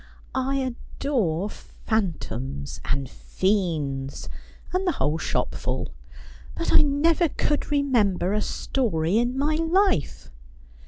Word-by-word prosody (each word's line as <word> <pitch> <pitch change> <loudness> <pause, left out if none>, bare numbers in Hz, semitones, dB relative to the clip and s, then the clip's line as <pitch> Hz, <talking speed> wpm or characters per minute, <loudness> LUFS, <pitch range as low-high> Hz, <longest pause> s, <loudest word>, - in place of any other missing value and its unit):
' - - -26
I 265 +1 0
adore 245 - -1
phantoms, 155 - -3
and 140 -1 -1
fiends, 150 -7 -1 0.4
and 370 +1 +1
the 355 - +3
whole 155 +2 0
shopful; - - -1 0.7
but 335 - -1
I - - +9
never 310 +4 +3
could 295 +1 0
remember 230 -11 +2
a 210 - +1
story 200 -9 0
in 245 +2 0
my 295 +3 +2
life.' 330 - +1
225 Hz, 110 wpm, -25 LUFS, -, 0.7 s, I